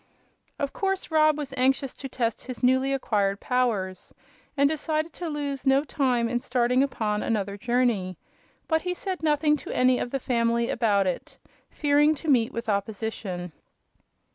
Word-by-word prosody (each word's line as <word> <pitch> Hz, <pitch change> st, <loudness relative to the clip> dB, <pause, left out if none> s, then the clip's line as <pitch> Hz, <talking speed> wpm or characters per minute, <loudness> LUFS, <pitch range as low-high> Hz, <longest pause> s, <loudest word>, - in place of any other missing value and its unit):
Of 280 Hz, -2 st, -3 dB
course 385 Hz, -3 st, -2 dB
Rob 310 Hz, -1 st, +4 dB
was 285 Hz, -3 st, -5 dB
anxious 265 Hz, +1 st, +1 dB
to 270 Hz, -, -7 dB
test 235 Hz, -2 st, -2 dB
his 255 Hz, 0 st, -7 dB
newly 260 Hz, +2 st, +3 dB
acquired 205 Hz, -7 st, 0 dB
powers, 215 Hz, -8 st, -1 dB, 0.5 s
and 280 Hz, 0 st, +5 dB
decided 310 Hz, +1 st, -1 dB
to 345 Hz, -2 st, -5 dB
lose 285 Hz, -2 st, -3 dB
no 270 Hz, +1 st, +4 dB
time 255 Hz, -5 st, +1 dB
in 240 Hz, +1 st, -1 dB
starting 250 Hz, +1 st, +1 dB
upon 215 Hz, -6 st, -1 dB
another 205 Hz, -3 st, -1 dB
journey. 230 Hz, -5 st, 0 dB, 0.5 s
But 320 Hz, -1 st, +2 dB
he 360 Hz, +1 st, -2 dB
said 375 Hz, 0 st, -4 dB
nothing 300 Hz, -1 st, +2 dB
to -, -, -10 dB
any 255 Hz, 0 st, +3 dB
of -, -, -2 dB
the 275 Hz, -, -2 dB
family 235 Hz, -1 st, +1 dB
about 205 Hz, -4 st, +2 dB
it, 180 Hz, -2 st, -4 dB, 0.3 s
fearing 295 Hz, +1 st, +3 dB
to 310 Hz, +2 st, -5 dB
meet 230 Hz, -4 st, +3 dB
with 230 Hz, 0 st, -5 dB
opposition. 200 Hz, -3 st, -3 dB
255 Hz, 160 wpm, -26 LUFS, 225-290 Hz, 0.5 s, and